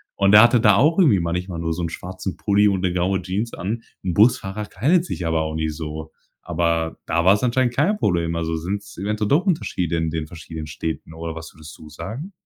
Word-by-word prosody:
Und 100 +1 +3
er 105 - +10
hatte 120 +1 +5
da 105 -3 +5
auch 155 - +3
irgendwie 140 - +5
manchmal 85 +1 -3
nur 80 0 -1
so 85 +1 -4
'n 85 - -2
schwarzen 95 +2 -6
Pulli 105 0 +3
und 95 -2 +1
'ne 90 -2 0
graue 95 +1 0
Jeans 100 +6 -3
an. 110 +6 -4 0.2
'N 90 -3 -2
Busfahrer 105 -2 +2
kleidet 155 - +1
sich 90 - -4
aber 80 -1 +1
auch 80 0 -4
nicht 80 -1 -2
so. 80 0 -6 0.3
Aber 85 -1 -1
da 85 +1 0
war's 100 +4 +4
anscheinend 120 0 +1
kein 185 - +2
Problem. 85 - 0
Also 80 0 -2
sind's 100 +5 -5
eventuell 105 +2 -1
doch 155 - +3
Unterschiede 90 - -1
in 80 -1 0
den 80 -1 -3
verschiedenen 80 -1 -8
Städten 80 +1 -5
oder 80 0 -6
was 80 0 -9
würdest 80 -1 -12
du 75 - -13
sagen? 110 - -7
90 Hz, 215 wpm, -22 LUFS, 80-105 Hz, 0.3 s, er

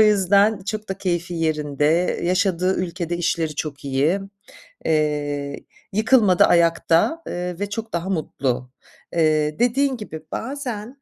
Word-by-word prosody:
yüzden 205 0 +4
çok 215 +1 -4
da 190 0 -4
keyfi 175 -2 -2
yerinde, 155 +1 +1
yaşadığı 185 0 +1
ülkede 175 -1 -3
işleri 165 -2 -1
çok 145 -1 -5
iyi. 140 +8 +1 0.7
Eee, 145 -2 -1 0.3
yıkılmadı, 215 -3 +4
ayakta, 170 - +3
eee, 180 0 -4
ve 205 0 -2
çok 225 +2 -5
daha 170 +2 -2
mutlu. 130 -7 -2 0.4
Eee, 155 -2 +2
dediğin 260 +3 +2
gibi, 160 -8 -8
"Bazen 255 -1 -5
175 Hz, 120 wpm, -22 LUFS, 155-205 Hz, 0.7 s, yüzden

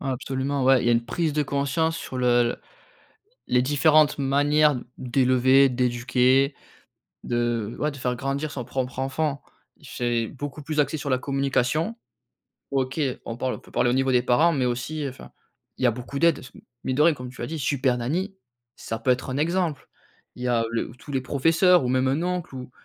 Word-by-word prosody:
Ouais, 135 - -4
absolument. 135 +2 -2
Ouais, 130 -1 +5
il - - -2
y - - +4
a 120 - +4
une 115 0 +1
prise 165 0 -1
de 150 0 +1
conscience 145 +4 -1
sur 130 - -6
le 120 -1 +2 0.9
les 125 0 +3
différentes 150 +2 +4
manières 145 0 +3 0.2
d'élever, 130 +1 +4
d'éduquer 125 +2 +2 0.7
de 120 -2 -1
ouais, 150 - 0
de 140 - -10
faire 125 -2 -2
grandir 140 +4 -3
son 130 -4 -5
propre 130 +1 -4
enfant. 140 +2 -2 0.4
C'est 120 -2 -2
beaucoup 145 +1 -7
plus 150 +1 -1
axé 145 +2 0
sur 145 -2 -4
la 130 - +2
communication. 140 - 0 0.8
OK, 135 +2 -1 0.3
on 115 0 -5
parle 130 0 -2
on - - -11
peut - - -19
parler 120 - +2
au 120 - +1
niveau 135 0 +1
des 125 -1 +4
parents 135 +8 +3
mais 130 -3 0
aussi, 125 +5 -3
heu, 140 - -2
enfin, 130 - -13 0.5
il - - -5
y - - +6
a - - +4
beaucoup 125 +4 -6
d'aides, 170 -3 +3
c 130 - -11 0.3
mine 130 - -1
de 150 - +2
rien, 165 +1 +5
comme 125 -3 -8
tu 130 - -11
as 120 - -3
dit, 160 - -5
Super 130 -3 +1
Nanny, 180 +11 -2 0.4
ça 115 0 -5
peut 130 - -2
être 125 +1 -1
un 130 - -2
exemple. 165 -2 -1 0.5
Il 125 - -8
y - - -1
a 120 -2 +2
le 115 - -2
ou - - -13
tous 145 - -12
les 135 -1 0
professeurs 165 +5 +3
ou - - 0
même 130 +1 +2
un 140 +5 0
oncle 180 -5 -3
ou 125 -1 -8
135 Hz, 205 wpm, -24 LUFS, 125-150 Hz, 0.9 s, y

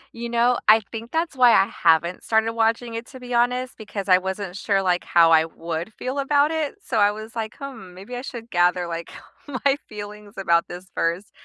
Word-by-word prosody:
You 235 0 -5
know, 240 +1 +2
I 220 +1 +7
think 230 +1 -7
that's 325 -2 -1
why 245 -2 +6
I 195 - +5
haven't 170 +1 +1
started 220 0 +1
watching 230 +1 0
it, 230 +2 -5
to 260 - -12
be 250 0 -7
honest, 250 +2 +1
because 205 -2 -6
I 185 -1 +6
wasn't 190 0 -5
sure, 195 0 0
like, 180 -1 +1
how 165 -1 +4
I 160 0 +6
would 165 +4 -5
feel 255 +5 -4
about 285 +2 +2
it. 315 0 -2
So, 235 - -2
I 205 0 +5
was, 215 +2 -9
like, 220 -1 -4
"Hmm, 255 -10 -9
maybe 200 +7 -9
I 245 - -4
should 235 -3 -8
gather, 175 0 +2
like, 170 -1 -6 0.5
my 275 - +5
feelings 210 -1 -9
about 170 -3 +2
this 180 +1 -9
first," 170 +4 -1
215 Hz, 210 wpm, -23 LUFS, 180-245 Hz, 0.5 s, I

